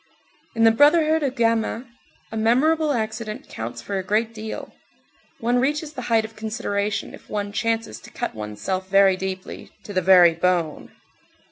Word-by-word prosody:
In 225 - +2
the 225 - +7
brotherhood 310 +5 +4
of 270 -3 -1
gamins, 230 +1 0 0.5
a - - -6
memorable 290 +8 +2
accident 220 -3 -4
counts 120 +1 -7
for 195 +6 -3
a - - -4
great 220 +4 0
deal. 220 0 -7 0.7
One 240 0 +1
reaches 295 +3 -1
the 260 - -6
height 225 -1 +3
of 220 0 -11
consideration 215 -2 -3
if - - -14
one 205 -1 -3
chances 225 +1 -2
to - - -14
cut - - -4
one's 105 -1 -7
self 185 0 -2
very 195 -1 +5
deeply, 185 0 -6
"to 205 - -8
the 185 - +1
very 180 -2 +7
bone." 170 -2 -1
220 Hz, 165 wpm, -23 LUFS, 190-235 Hz, 0.7 s, the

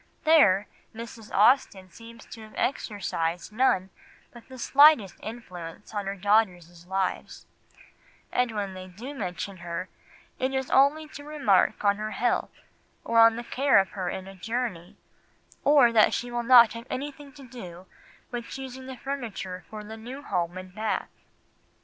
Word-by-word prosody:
There, 210 -12 +5 0.3
Mrs. 230 -1 -9
Austen 205 -4 +3
seems 230 +3 -13
to 225 - -11
have 215 0 -13
exercised 180 -8 -2
none 210 -6 +2 0.4
but 235 -1 -14
the 260 - -11
slightest 275 - +5
influence 195 -5 -9
on 205 -2 -3
her 195 - -3
daughters' 180 -4 0
lives, 190 0 -3 0.9
and 250 -1 +1
when 205 -3 -3
they 185 0 -9
do 225 +10 -9
mention 200 -4 -5
her, 175 +1 -5 0.5
it 260 +1 -1
is 265 -1 -2
only 290 +3 +4
to 285 - -10
remark 285 -10 +1
on 200 0 +3
her 215 0 -4
health, 240 0 -1 0.4
or 230 0 +6
the 230 +1 -6
care 270 +2 +2
of 195 -1 +3
her 185 -3 -3
in 190 +1 -6
a 195 - -10
journey, 210 -3 -4 0.7
or 280 -5 +6
that 220 -2 +4
she 245 0 -4
will 240 0 -1
not 235 -2 +7
have 230 +2 -9
anything 285 +1 -6
to 275 -3 -13
do 185 -8 -10 0.5
with 240 -1 -5
choosing 260 -1 -8
the 260 -1 -8
furniture 220 -10 -5
for 215 -1 -8
the 220 +1 -9
new 250 +6 -9
home 175 -4 -2
in 185 0 -8
Bath. 215 +4 -3
220 Hz, 155 wpm, -27 LUFS, 190-255 Hz, 0.9 s, not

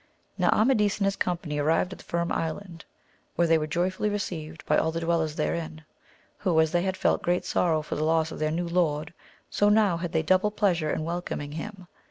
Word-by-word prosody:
Now - - +2
Amadis 215 -3 +3
and 200 - 0
his 195 0 +1
company 170 -4 -2
arrived 165 +5 +1
at - - -11
the - - -12
Firm 170 0 -1
Island, 165 +1 -4 0.5
where 170 - +3
they 165 -1 +4
were 155 - -2
joyfully 185 +6 0
received 160 -7 -5
by 150 - +2
all 160 - +2
the 165 +1 -3
dwellers 165 -2 0
therein, 160 -2 -3 0.5
who, 175 -5 +2
as 160 -1 +3
they 175 - +2
had 190 +1 -2
felt - - +1
great 175 +1 0
sorrow 160 -3 +1
for - - -5
the 150 - -1
loss 160 0 +2
of - - -7
their 155 0 +1
new 170 +2 -2
lord, 170 -3 0 0.4
so 205 - +3
now 210 -5 +4
had 170 -1 -4
they 160 -1 +1
double 185 +5 +3
pleasure 185 -7 +1
in 155 - -1
welcoming 165 -3 -4
him. 185 +4 -7
170 Hz, 215 wpm, -27 LUFS, 160-185 Hz, 0.5 s, they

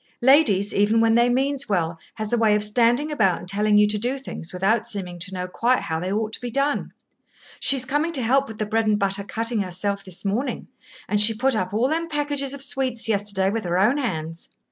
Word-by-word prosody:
Ladies, 230 -8 +4
even 205 +3 +2
when 225 0 +3
they 235 +1 +4
means 270 +2 -1
well, 170 -4 0 0.2
has 215 +1 -3
a - - +3
way 215 -2 +3
of 210 - +1
standing 240 +7 +2
about 205 -11 +2
and - - -10
telling 210 +2 +2
you 210 - +6
to 210 0 0
do 250 +5 -1
things 260 -10 -8
without 215 +5 0
seeming 185 -6 -6
to 185 +3 -3
know 180 -1 -4
quite 240 +7 +1
how 160 0 -3
they 180 +3 -3
ought 220 +1 -2
to - - -4
be 245 - -4
done. 275 +4 -1 0.7
She's 270 -2 +2
coming 295 +5 0
to 265 -5 0
help 270 +4 +2
with 220 - -9
the 215 - -2
bread 220 +1 0
and 210 -1 +3
butter 200 0 +1
cutting 225 +2 -2
herself 200 +2 -3
this 185 0 -8
morning, 225 +8 -2 0.4
and 210 0 +3
she 220 +1 +5
put 260 +3 +1
up 185 -4 -2
all 225 +5 +1
them 330 +3 -2
packages 290 -2 -1
of 280 -1 -2
sweets 260 -4 -1
yesterday 200 -2 +1
with 225 +1 -3
her 175 0 -1
own 230 +10 +2
hands. 165 - -5
220 Hz, 230 wpm, -23 LUFS, 200-260 Hz, 0.7 s, you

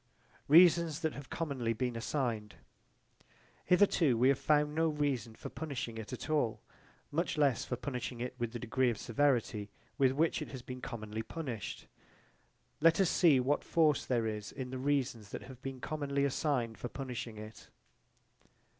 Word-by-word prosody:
Reasons 165 0 +6
that 160 -2 0
have 140 -1 -9
commonly 135 -8 -2
been 125 +1 -2
assigned 115 - -2 1.1
Hitherto 175 - +4
we 125 +3 +5
have 140 - +3
found 150 -1 +2
no 165 +1 +2
reason 140 -7 -1
for - - -7
punishing 130 -7 -5
it 110 -1 -7
at 125 - -6
all: 145 -8 +1 0.5
much 165 +2 -1
less 140 -5 +2
for 125 - -2
punishing 125 -1 -4
it 125 +1 -3
with 120 -1 -2
the 120 - -4
degree 120 +2 +1
of 115 - -2
severity 115 -5 0 0.3
with 130 -1 +4
which 160 +3 +1
it 150 - -4
has 130 -3 -8
been 125 0 -7
commonly 110 -3 -5
punished. 120 - -6 0.9
Let 165 +3 +5
us 190 -3 +4
see 160 -8 +5
what 135 +4 +1
force 155 -4 +3
there 120 -3 0
is 105 -1 -4
in 130 -2 -6
the 130 - -4
reasons 130 -6 -1
that - - -6
have 130 -1 -12
been 135 -1 -6
commonly 140 0 -1
assigned 130 -5 -1
for 120 - -4
punishing 125 -4 -5
it. 110 0 -10
130 Hz, 165 wpm, -33 LUFS, 115-150 Hz, 1.1 s, Reasons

